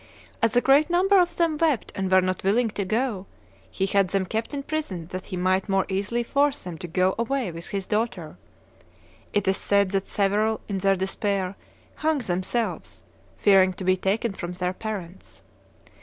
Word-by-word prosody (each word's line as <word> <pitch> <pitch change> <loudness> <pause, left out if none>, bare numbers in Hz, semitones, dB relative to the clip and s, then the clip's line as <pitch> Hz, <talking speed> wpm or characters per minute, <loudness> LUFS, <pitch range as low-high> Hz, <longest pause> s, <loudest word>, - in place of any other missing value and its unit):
As 230 0 +2
a 245 - +5
great 285 +5 +4
number 380 +3 +4
of 350 -1 +1
them 335 -3 +1
wept 310 -8 +1
and 190 -1 -2
were 185 0 +6
not 185 0 -2
willing 225 +5 +2
to 205 - -3
go, 215 -1 -1 0.4
he 190 - -1
had 195 0 +2
them 190 +1 0
kept 220 +4 -3
in 280 -1 -4
prison 275 - -4
that 185 0 -6
he 185 - -5
might 185 +2 +1
more 195 -1 +2
easily 205 +5 -1
force 280 +3 +1
them 180 -2 -6
to 175 - -6
go 185 +3 +1
away 240 -3 -1
with 165 +1 -8
his 195 -2 -3
daughter. 190 -8 -2 1.0
It 205 -2 0
is 190 - +2
said 200 -2 +2
that 195 -1 -1
several, 210 +2 +1
in 195 -2 -2
their 195 +1 +3
despair, 195 0 -2 0.4
hung 315 0 +1
themselves, 215 +1 -3 0.3
fearing 190 -2 +5
to 185 - -8
be 185 0 +3
taken 200 +4 -1
from 175 -2 -5
their 180 0 -2
parents. 195 -4 -7
200 Hz, 185 wpm, -25 LUFS, 185-235 Hz, 1.0 s, were